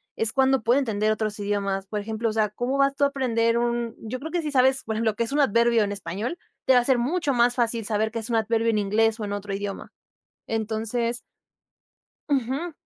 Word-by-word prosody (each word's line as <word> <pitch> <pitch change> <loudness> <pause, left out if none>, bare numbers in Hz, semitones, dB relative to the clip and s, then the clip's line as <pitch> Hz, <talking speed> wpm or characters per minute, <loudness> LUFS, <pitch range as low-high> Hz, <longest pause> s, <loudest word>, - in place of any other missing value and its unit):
es 225 -1 +2
cuando 265 -1 +3
puede 240 +5 +3
entender 215 -5 0
otros 215 -1 -2
idiomas. 200 -1 -2
Por 210 +1 -3
ejemplo, 220 +2 -2
o - - -3
sea, 215 -1 +1
cómo 245 +6 -2
vas 275 0 +3
tú 285 - 0
a - - +6
aprender 235 -4 +1
un 235 -1 -1
yo 235 +3 -5
creo 320 +4 -7
que 350 - 0
si 300 - -3
sabes, 265 0 +3
por 220 - -3
ejemplo, 220 -1 0
qué 235 - 0
es 230 - -4
un 290 - 0
adverbio 235 -3 +3
en 200 - -2
español, 205 - -4 0.3
te 265 - +5
va 250 - +7
a - - 0
ser 265 -1 +4
mucho 290 +3 0
más 245 0 +3
fácil 230 -2 0
saber 220 +1 0
qué 230 - -3
es 225 +1 -5
un 235 - 0
adverbio 225 +1 +1
en 220 - +1
inglés, 220 +2 +1
o 215 - -3
en 205 - -4
otro 205 0 -4
idioma. 200 0 -5 0.6
Entonces 225 +2 -2 1.1
Ujú. 275 +5 -1
230 Hz, 230 wpm, -25 LUFS, 215-255 Hz, 1.1 s, va